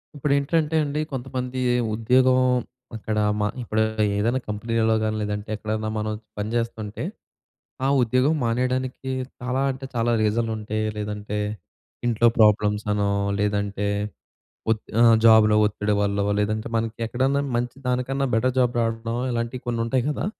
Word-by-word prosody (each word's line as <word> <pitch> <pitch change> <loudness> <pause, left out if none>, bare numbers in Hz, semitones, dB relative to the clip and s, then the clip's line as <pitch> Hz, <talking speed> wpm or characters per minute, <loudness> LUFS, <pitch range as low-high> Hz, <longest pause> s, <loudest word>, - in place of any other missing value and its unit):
ఇప్పుడేంటంటే 145 +3 +1
అండి. 150 +1 -2
కొంతమంది 130 0 -4 0.4
ఉద్యోగం 125 +3 +4 0.6
అక్కడ 110 0 -3 0.2
మా 105 - +2
ఇప్పుడు 110 -2 -1 0.4
ఏదైనా 115 +5 +1
కంపెనీలలో 110 +1 +1
కాని, 110 0 0
లేదంటే 105 0 -3
ఎక్కడైనా, 110 +1 -3
మనం 110 0 -2 0.3
పని 105 +1 -2
చేస్తుంటే 110 -3 -3 0.8
ఆ - - +3
ఉద్యోగం 130 +5 +2
మానేయడానికి 130 +2 -1 0.3
చాలా 125 +1 -1
అంటే, 135 +1 -7
చాలా 120 0 +1
రీజన్లు 110 +2 +1
ఉంటాయి. 110 0 -3
లేదంటే 105 0 -4 0.7
ఇంట్లో 120 0 +3
ప్రాబ్లమ్స్ 105 -1 +3
అనో, 105 -1 +1 0.3
లేదంటే 100 0 -1 0.8
ఒత్ 110 -1 0 0.2
ఆహ్, 115 -1 +7
జాబ్‌లో 110 -1 +7
ఒత్తిడి 105 0 0
వల్లో 100 0 0 0.2
లేదంటే, 110 +1 -1
మనకి 115 0 -2
ఎక్కడన్నా 130 +4 +1 0.2
మంచి, 120 +1 -2
దానికన్నా 125 +2 0
బెటర్ 125 +3 +2
జాబ్ 125 -1 +2
రావడం 115 0 -1 0.2
ఇలాంటివి 120 +1 -3
కొన్ని 115 -1 -1
ఉంటాయి 125 +2 +1
కదా! 150 - -2
115 Hz, 130 wpm, -24 LUFS, 105-125 Hz, 0.8 s, ఆహ్